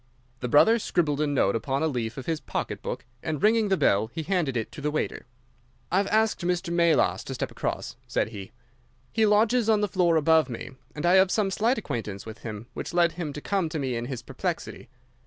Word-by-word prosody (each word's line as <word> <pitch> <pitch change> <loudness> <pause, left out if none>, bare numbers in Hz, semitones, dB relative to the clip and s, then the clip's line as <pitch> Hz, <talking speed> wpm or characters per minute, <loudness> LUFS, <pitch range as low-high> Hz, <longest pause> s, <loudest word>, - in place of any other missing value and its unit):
The 125 - -3
brother 220 - +5
scribbled 155 -8 0
a 150 - +2
note 130 -9 +2
upon 135 +5 -1
a - - +3
leaf 120 -5 -3
of 135 - -6
his 165 -2 -1
pocket - - -4
book, - - -5 0.2
and, 155 -3 -3
ringing 220 0 +4
the 190 - +3
bell, 105 - +3
he 160 - -4
handed 160 -7 0
it 110 - -3
to - - -9
the 150 - 0
waiter. 150 -4 -3 0.6
"I 180 - +3
have 200 0 +2
asked 220 -1 +2
Mr. 175 0 -1
Melas 170 -2 +3
to - - -5
step - - -3
across," - - -4
said - - 0
he. 100 -4 -8 0.6
"He 220 -1 +3
lodges 220 +2 +3
on 215 -1 +4
the 210 - +2
floor 180 -3 +2
above 160 -2 +4
me, 120 +2 -6 0.2
and 150 - -3
I 180 +2 +6
have 190 0 +5
some 200 -1 +1
slight 230 +6 +1
acquaintance 110 - -4
with 110 0 -9
him, 110 -1 -7
which - - -6
led 170 -1 +4
him 165 -4 -4
to 150 - -7
come 190 -2 0
to 155 - -4
me 130 -4 -2
in 115 0 -3
his 130 -1 -5
perplexity. - - -4
160 Hz, 225 wpm, -26 LUFS, 130-195 Hz, 0.6 s, I